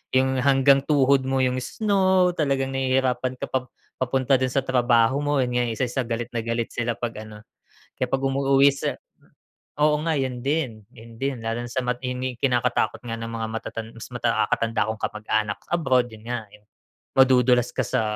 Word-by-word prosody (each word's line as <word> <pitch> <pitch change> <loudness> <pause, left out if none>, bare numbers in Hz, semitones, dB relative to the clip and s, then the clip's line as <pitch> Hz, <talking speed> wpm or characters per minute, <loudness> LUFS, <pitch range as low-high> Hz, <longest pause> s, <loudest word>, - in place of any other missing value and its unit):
yung 130 0 +2
hanggang 135 +1 +5
tuhod 140 -2 +3
mo 135 0 +1
yung 130 0 +1
snow, 190 - +2
talagang 135 -5 -1
nahihirapan 130 -1 0
ka - - -4
pa 130 -1 -2 0.3
papunta 130 +1 +2
dun 130 0 -1
sa 135 - +1
trabaho 125 0 +3
mo. 145 -1 +1
Yun 125 -1 0
nga 125 - +2
isa 125 +3 -1
sa 130 +2 -2
galit 115 0 -3
na 115 - -1
galit 115 0 -2
sila 120 -1 -2
'pag 115 -3 -5
ano, 105 0 -12 0.5
kaya 130 - -1
'pag 135 - 0
umuwi 135 +1 +4
sa - - -3 0.8
oo 150 0 +4
nga, 165 - +1
yun 130 -3 -2
din 135 -7 -1
yun 115 0 -14
din. 135 -2 -2
Lalo 115 +2 -2
sa 130 +2 -2
matini 125 +1 -3
kinakatakot 125 -2 +1
nga 115 -1 -4
ng 115 0 -5
mga 115 -1 -3
matatan 110 0 -5
mas 115 - -9
makakatanda 115 -2 0
kong 110 - -8
kamag-anak 105 -1 -1
sa - - -25
abroad 130 -7 +2
yun 110 0 -13
nga, 110 -3 -4 0.7
madudulas 125 -2 +4
ka 130 - -1
sa - - 0
125 Hz, 180 wpm, -24 LUFS, 115-135 Hz, 0.8 s, hanggang